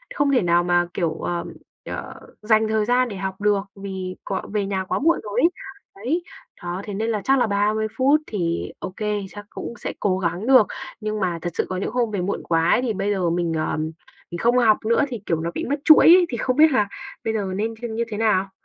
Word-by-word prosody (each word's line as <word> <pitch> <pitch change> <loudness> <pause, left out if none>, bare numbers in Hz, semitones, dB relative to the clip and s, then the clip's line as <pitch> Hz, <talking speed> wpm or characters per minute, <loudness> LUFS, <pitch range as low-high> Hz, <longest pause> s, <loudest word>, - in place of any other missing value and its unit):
không 285 -1 +2
thể 255 - +3
nào 175 -1 +3
mà, 175 0 +2
kiểu, 165 -2 0
ờm, 175 +1 -4 0.3
ờ, - - -6 0.3
dành 220 0 +3
thời 215 -1 +1
gian 250 +1 +2
để 205 - -6
học 190 0 -5
được, 205 -1 +2 0.2
vì 190 -2 -5
có 195 - -3
về 205 -2 0
nhà 190 -1 -2
quá - - -1
muộn 330 +4 +3
rồi 205 -1 -2
ấy. 335 - +5 0.5
Đấy, 270 - -2 0.4
đó, 175 +2 -4
thế 205 - -6
nên 220 +3 -2
là 215 -3 -1
chắc 270 0 +3
là 245 - +2
30 210 +1 +1
phút 280 +4 +4
thì 170 -5 -2
ô 185 -1 -6
kê, 210 -1 -1
chắc 205 0 -10
cũng - - -6
sẽ - - -5
cố 185 -2 +1
gắng 180 +4 -2
được. 255 -5 +6 0.3
Nhưng 215 0 -3
mà 180 -4 -1
thật 175 - -2
sự - - -1
có 185 - -2
những 195 - -3
hôm 240 -2 0
về 200 - -2
muộn 190 +3 -2
quá 165 0 +1
ấy, 245 - +4
thì 235 -4 -1
bây 200 +1 -1
giờ 185 -4 0
mình, 170 -1 0
ờm, 155 0 -2 0.4
mình 175 - -4
không 235 +4 +3
học 225 -4 +5
nữa 230 +5 +3
thì, 240 -4 -5
kiểu, 165 -1 0
nó 170 +1 -2
bị - - -2
mất 285 +1 0
chuỗi 310 - +8
ấy, 355 +2 +8
thì 240 - -3
không 255 +2 0
biết 310 +1 +6
là 210 -6 +2 0.4
bây 225 - -1
giờ 210 -2 -1
mình 190 0 -4
nên 225 +2 -1
thêm 230 -2 -4
như 230 - 0
thế 210 -2 -5
nào? 195 -4 +2
210 Hz, 250 wpm, -22 LUFS, 185-235 Hz, 0.5 s, chuỗi